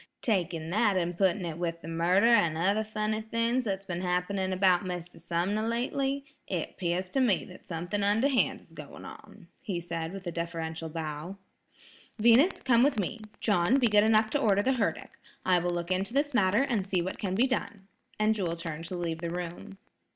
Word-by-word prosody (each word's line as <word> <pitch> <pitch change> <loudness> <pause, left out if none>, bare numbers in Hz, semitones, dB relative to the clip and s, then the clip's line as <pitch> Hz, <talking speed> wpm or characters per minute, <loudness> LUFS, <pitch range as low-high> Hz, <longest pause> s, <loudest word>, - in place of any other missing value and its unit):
Taking 170 -7 -1
that 205 -1 +2
an' 175 -1 0
putting 190 +1 +1
it 165 -1 -5
with 170 -1 -3
the - - -7
murder 170 +5 +2
an' 205 -9 +4
other 200 +6 +2
funny 215 0 -2
things 230 +3 0
that's 195 -2 -2
been 175 -2 -4
happening 185 +1 -1
about 185 0 +3
Mr. 180 -2 -6
Sumner 175 +6 -1
lately, 270 +4 -1 0.2
it 175 -4 -3
'pears 180 +1 -1
to 270 - +1
me 235 -8 +2
that 185 - -14
something 175 +4 -3
underhand 225 +7 +2
is - - -19
going - - -10
on," - - -12
he 200 -9 -3
said 165 -1 -4
with 195 0 -8
a 175 - -3
deferential 165 -1 -4
bow. 155 +3 -5 0.8
"Venus, 235 - +5
come 240 -3 +4
with 275 -1 +3
me. 215 +3 -2 0.2
John, 195 +2 +3
be 250 -4 +3
good 210 0 +5
enough 220 0 +3
to 290 - +1
order 205 -4 +3
the 265 - +2
herdic. 230 -5 -2 0.3
I 180 -1 +4
will 175 +1 -1
look 175 0 -3
into 195 +6 -1
this 290 0 +1
matter 205 +2 +3
and 220 -8 -1
see 185 -3 0
what 185 - -5
can 190 -2 -2
be 235 +6 +4
done," 205 -6 -3 0.3
and 215 +1 +3
Jewel 180 -6 -2
turned 165 -1 -6
to 180 - -5
leave 170 -2 -3
the 170 0 -3
room. 175 +2 -6
190 Hz, 195 wpm, -29 LUFS, 170-220 Hz, 0.8 s, Venus